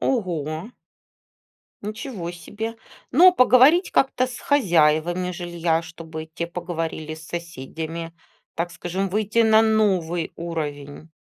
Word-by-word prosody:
Ого! 175 - -2 1.1
Ничего 210 -4 -5
себе! 220 +6 -6 0.4
Но 355 +7 +8
поговорить 275 +5 +5
как-то 260 -1 +2
с 250 -1 -8
хозяевами 175 - +2
жилья, 175 -2 -1
чтобы 160 -1 -8
те 170 +1 -5
поговорили 165 -3 -4
с 160 0 -12
соседями, 165 0 -6 0.4
так 170 +1 -3
скажем, 185 +3 -3
выйти 215 +3 -1
на 220 -1 +6
новый 185 -7 +1
уровень. 150 -3 -5
175 Hz, 105 wpm, -23 LUFS, 160-220 Hz, 1.1 s, Но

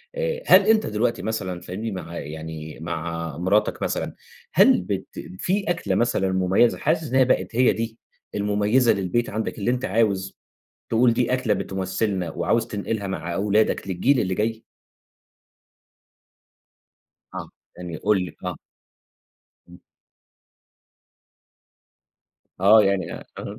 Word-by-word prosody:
آآ - - -2
هل 190 - +8
أنت 220 -1 +4
دلوقتي 110 +3 -1
مثلًا 95 -5 -3
فاهمني؟ 105 +5 -5
مع 90 -3 -6
يعني 80 +1 -7
مع 85 -1 -4
مراتك 100 +5 +1
مثلًا، - - -2 0.4
هل - - +6
بت - - -3 0.3
في 195 +2 0
أكلة 175 0 0
مثلًا 95 -5 +1
مُميّزة 95 +5 +3
حاسس 155 -1 0
إنّها 130 0 +6
بقت 125 -2 0
هي 125 0 +4
دي 115 0 -4 0.4
المُميّزة 105 +4 +2
للبيت 100 +5 -1
عندك 110 +2 -3
اللي 120 +5 +1
أنت 125 +1 -1
عاوز 100 -2 0 0.5
تقول 115 +1 +4
دي 125 +1 0
أكلة 125 -5 +1
بتُمثِّلنا 95 -1 -2
وعاوز 115 +7 0
تنقلها 105 0 -3
مع 85 -2 -4
أولادك 105 0 +1
للجيل 120 +9 +2
اللي 95 -2 0
جاي؟ 110 +2 -2 2.7
آه. - - -6 0.3
يعني 90 -2 -6
قُل 100 0 +1
لي، - - -10
آه. 90 -1 -3 1.1
إمم. 90 - -14 2.8
آه. 105 +3 +7
يعني 95 -3 0 0.3
أها. - - -7
105 Hz, 120 wpm, -23 LUFS, 90-115 Hz, 2.8 s, هل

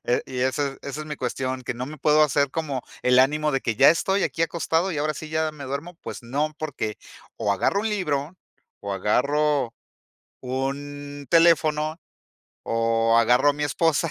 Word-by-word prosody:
eh, 120 - +1
y 130 -1 -5
esa, 135 +2 0
e - - -18
esa 140 +2 -5
es 155 - -7
mi 150 - -5
cuestión, 130 0 -3
que 125 - -3
no 125 +1 -5
me 155 +2 -8
puedo 150 +1 +4
hacer 145 -1 +2
como 145 -5 -3 0.2
el 125 0 +4
ánimo 150 +3 +3
de 135 - +1
que 115 - -1
ya 135 +6 +6
estoy 190 +5 +2
aquí 165 - -1
acostado 170 +2 0
y 150 - -3
ahora 155 0 0
sí 155 +1 -8
ya 155 0 0
me 150 -2 -10
duermo. 140 +7 -5
Pues - - -7
no, 145 +6 -1
porque 130 -9 -4 0.4
o 100 - 0
agarro 150 - +1
un 220 - -1
libro 165 -6 -2 0.4
o 100 0 -4
agarro 140 +6 +1 0.7
un 145 +2 -5
teléfono 160 -1 +3 0.6
o 115 0 +2
agarro 125 +5 +4
a - - 0
mi 150 +1 -5
esposa. 160 +1 +1
145 Hz, 185 wpm, -24 LUFS, 130-155 Hz, 0.7 s, ya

